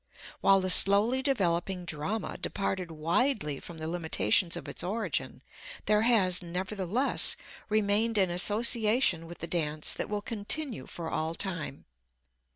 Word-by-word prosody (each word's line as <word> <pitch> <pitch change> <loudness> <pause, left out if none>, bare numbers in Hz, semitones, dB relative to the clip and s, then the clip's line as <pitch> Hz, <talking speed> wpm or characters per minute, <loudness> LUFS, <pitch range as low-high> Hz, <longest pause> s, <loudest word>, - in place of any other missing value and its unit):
While 195 -1 +3
the 185 0 +3
slowly 205 +8 +6
developing 185 -8 -1
drama 175 +7 -4
departed 190 -3 -4
widely 165 - -1
from 170 - -11
the 160 0 -5
limitations 165 - 0
of - - -9
its - - -5
origin, 175 - -4 0.4
there 210 0 +2
has, 200 -6 +3
nevertheless, 190 +7 +1 0.3
remained 215 +1 +1
an 190 -3 +2
association 215 -1 +2
with 170 - -10
the - - -5
dance 155 -3 0
that - - -4
will 210 -1 -4
continue 240 +3 -1
for 165 -2 -7
all 160 +1 -3
time. 165 -8 -3
190 Hz, 135 wpm, -28 LUFS, 170-215 Hz, 0.4 s, slowly